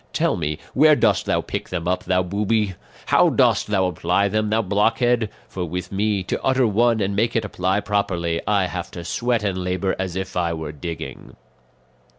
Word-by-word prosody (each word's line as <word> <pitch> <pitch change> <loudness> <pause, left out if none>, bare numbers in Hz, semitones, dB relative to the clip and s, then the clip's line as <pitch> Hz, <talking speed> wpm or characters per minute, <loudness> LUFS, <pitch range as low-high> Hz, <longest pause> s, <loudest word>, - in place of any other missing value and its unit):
Tell - - +1
me, 75 -2 -2 0.2
where 150 +2 +6
dost - - +2
thou - - +1
pick - - -5
them 85 -2 -3
up, 90 0 -1
thou 90 0 +2
booby? 100 +2 0 0.3
How - - +4
dost - - +2
thou 95 -3 +1
apply 95 +3 +1
them, 110 +1 0
thou 110 +1 +1
blockhead? 115 +3 +2 0.2
For 90 - -5
with 90 +1 -5
me, 100 0 0
to - - -3
utter 130 -1 +3
one 115 +1 +2
and 100 0 -1
make 115 +3 +1
it 115 -2 +1
apply 95 0 0
properly, 85 -5 -1
I 100 -3 +2
have 90 -1 -5
to 85 - -5
sweat 120 +5 0
and 95 -3 -1
labour 90 +1 -1
as 95 -2 -3
if 95 0 -4
I 85 -2 0
were 80 -2 -5
digging." 80 +2 -7
95 Hz, 190 wpm, -22 LUFS, 90-110 Hz, 0.3 s, where